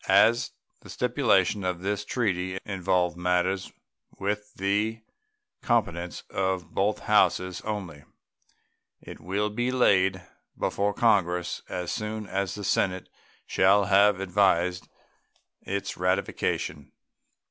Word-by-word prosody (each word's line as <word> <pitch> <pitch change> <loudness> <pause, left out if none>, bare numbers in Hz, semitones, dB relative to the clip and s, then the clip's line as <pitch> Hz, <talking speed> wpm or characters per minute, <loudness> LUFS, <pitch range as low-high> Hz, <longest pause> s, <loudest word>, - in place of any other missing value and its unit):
As 120 +2 +4 0.3
the - - -15
stipulations 110 -6 +1
in 90 -1 -2
this 100 +1 -1
treaty 95 -6 -1
involve 90 -3 0
matters 90 +2 0 0.5
with 105 +1 -3
the 105 +3 -1 0.6
competence 90 -7 -1
of 95 -3 -2
both 100 +2 0
Houses 90 -3 +2
only, 95 -9 -5 0.9
it - - -11
will 100 +6 -2
be 120 +4 -1
laid 95 -7 +3 0.3
before 100 0 -1
Congress 90 -6 +1
as 90 -1 -3
soon 105 0 -4
as 95 -2 -2
the 105 - -7
Senate 95 -1 0 0.4
shall 100 +2 +4
have 100 0 +4
advised 90 -2 +1 0.7
its 100 0 -4
ratification. 90 -4 -1
95 Hz, 105 wpm, -27 LUFS, 90-105 Hz, 0.9 s, As